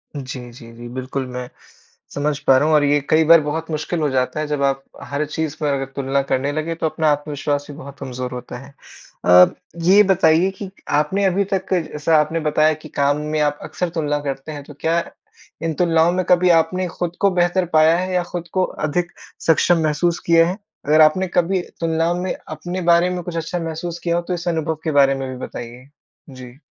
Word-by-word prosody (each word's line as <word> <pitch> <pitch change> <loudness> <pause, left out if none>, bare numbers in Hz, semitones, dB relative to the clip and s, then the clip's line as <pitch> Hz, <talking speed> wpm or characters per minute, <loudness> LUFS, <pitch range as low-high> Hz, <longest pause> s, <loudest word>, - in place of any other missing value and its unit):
जी, 130 -3 -7
जी, 115 -1 -13
जी, 120 +1 -10
बिल्कुल 130 +2 -4
मैं 125 0 -6 0.7
समझ 145 0 0
पा 135 -3 +4
रहा 145 - +2
हूँ 155 - +4
और 150 - +4
ये 145 0 +3
कई 160 +1 +4
बार 165 -1 +8
बहुत 160 +2 -4
मुश्किल 155 +2 -2
हो 150 -2 +1
जाता 130 +2 -1
है 155 - -2
जब 145 -1 -1
आप 135 0 0 0.2
हर 145 +2 -2
चीज़ 155 0 -3
पर 145 -2 +1
अगर 135 -1 -2
तुलना 140 0 0
करने 135 +1 -1
लगे, 155 +3 -3
तो 165 - -3
अपना 155 0 0
आत्मविश्वास 145 -1 -2
भी - - -10
बहुत 140 0 -10
कमज़ोर 125 -2 -5
होता 125 0 -7
है। 140 +2 -13 0.5
अ, 90 0 +8 0.4
ये 200 +4 +7
बताइए 170 0 +4
कि 200 - -6 0.3
आपने 190 +7 0
अभी 195 +1 +2
तक 190 0 -1
जैसा 160 -2 +1
आपने 160 +2 0
बताया 155 0 +2
कि 155 0 -11
काम 140 0 +1
में 155 - 0
आप 145 0 0
अक्सर 180 - -3
तुलना 150 -2 0
करते 140 +1 -5
हैं, 145 -2 -7
तो 145 - -12
क्या 165 +1 +2 0.6
इन 165 -1 -1
तुलनाओं 165 -1 +3
में 185 +1 0
कभी 180 0 +4
आपने 175 +2 +2
खुद 175 0 -4
को 200 -1 +4
बेहतर 180 +1 +1
पाया 160 +1 +5
है 185 +1 -2
या 180 -1 +1
खुद 175 -1 -6
को 185 - +2 0.2
अधिक 175 +3 -1 0.4
सक्षम 165 +1 +4
महसूस 160 +3 0
किया 165 0 +5
है? 180 +3 -3 0.3
अगर 155 +2 +5
आपने 170 +5 +4
कभी 180 +1 +1 0.2
तुलनाओं 165 +1 +1
में 185 - -1 0.2
अपने 175 +4 -5
बारे 170 +1 +4
में 180 -1 -3
कुछ 170 -1 -5
अच्छा 170 +2 -3
महसूस 165 +1 -5
किया 170 -1 0
हो, 175 - +1
तो 175 +1 -4
इस 175 0 -5
अनुभव 160 -1 -1
के 160 - -1
बारे 140 -2 +4
में 135 -1 -4
भी 130 - -6
बताइए? 120 +2 -9 0.4
जी। 130 -1 -11
155 Hz, 215 wpm, -20 LUFS, 140-175 Hz, 0.7 s, बार